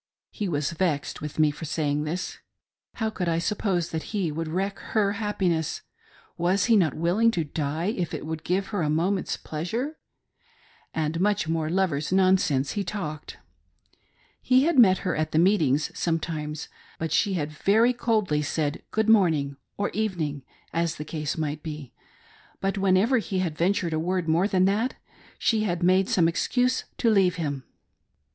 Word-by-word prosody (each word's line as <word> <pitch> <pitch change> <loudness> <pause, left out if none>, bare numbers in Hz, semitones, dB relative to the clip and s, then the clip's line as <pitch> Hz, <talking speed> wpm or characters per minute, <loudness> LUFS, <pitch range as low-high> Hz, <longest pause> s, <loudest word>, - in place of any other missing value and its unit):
He 205 -3 -3
was 145 -2 -1
vexed 160 -4 -1
with 150 -1 -6
me 155 -1 +4
for 155 +2 -8
saying 150 -1 -1
this. 175 +4 -4 0.6
How 220 -1 -1
could 180 -5 -2
I 165 - +1
sup 180 +5 -1
pose 180 -5 0
that 160 -1 -2 0.2
he 180 -6 0
would 165 +2 -3
wreck 190 +5 -2 0.2
her 200 -2 +3
happiness 195 -6 -1
t - - -18 0.6
Was 180 +3 +2
he 230 - +4
not 170 -8 +3
will 170 +5 0
ing 230 0 +6
to 175 -7 0
die 155 +6 -2
if 175 -3 -2
it - - -5
would 160 0 -5
give 190 +3 -1
her 205 -4 -2
a 150 - 0
moment's 180 +5 0
pleasure 175 - -3
.■• - - -8 1.0
And 160 +1 -1
much 205 -2 +1
more 160 -1 -1
lovers' 170 -5 0
nonsense 185 -8 +3
he 205 - -2
talked. 160 -6 -5 1.0
He 255 +1 +4
had 330 -3 +3
met 190 -6 +7
her 185 - 0
at 155 0 -2
the - - +2
meetings 160 -6 +3
sometimes, 155 -2 -2 0.3
but 160 -1 -3
she 200 +4 +2
had 155 -4 -2
very 220 +10 +3
coldly 215 -10 +1
said 150 0 -2
good 220 0 0
morning, 160 -10 +3 0.2
or 205 - -1
evening, 175 -10 -2 0.3
as 170 -1 0
the 150 - -6
case 150 -1 -3
might 150 -1 -2
be; 150 -4 -7 0.7
but 195 +1 -1
whenever 195 +6 +3
he 200 -3 -3
had 175 -4 -1
ventured 175 0 +1
a 155 - 0
word 180 +1 -1
more 165 +5 +3
than 185 -3 +2
that, 215 +6 +1 0.4
she 220 -2 +2
had 175 -4 -1
made 185 +2 +4
some 170 -3 +3
excuse 250 +9 +1
to 230 - +3
leave 190 -4 +3
him. 145 -6 -3
175 Hz, 180 wpm, -26 LUFS, 155-200 Hz, 1.0 s, met